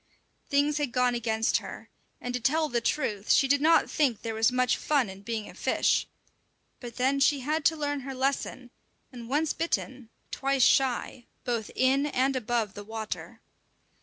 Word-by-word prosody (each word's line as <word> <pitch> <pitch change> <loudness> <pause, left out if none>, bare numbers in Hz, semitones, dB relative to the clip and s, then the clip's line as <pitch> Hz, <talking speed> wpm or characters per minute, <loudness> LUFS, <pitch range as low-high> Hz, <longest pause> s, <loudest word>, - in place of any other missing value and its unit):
Things 290 +1 +2
had 290 -4 -1
gone 250 0 +2
against 225 -1 +1
her, - - -9 0.3
and 245 - -5
to 250 - -1
tell 305 +6 +1
the 240 -1 0
truth 225 -6 -2
she 270 - +5
did 285 +1 +2
not 325 +2 +4
think 270 -8 0
there 225 -1 -3
was 225 +2 +2
much 250 -1 +2
fun 275 -9 0
in 190 +1 -12
being 220 0 -4
a - - -11
fish; - - +1 0.7
but 240 -2 -9
then 265 +2 +1
she 275 0 +3
had 305 +4 -1
to 320 - +3
learn 290 -1 -2
her 270 0 -7
lesson, 260 -2 -2 0.4
and 240 -2 -10
once 295 +3 +1
bitten, 260 -7 -3 0.2
twice 275 -1 +1
shy, 255 -2 +1 0.2
both 235 -3 -2
in 270 +3 +2
and 270 -1 0
above 235 -4 -1
the 205 - -8
water. 220 +1 -6
255 Hz, 175 wpm, -28 LUFS, 235-280 Hz, 0.7 s, she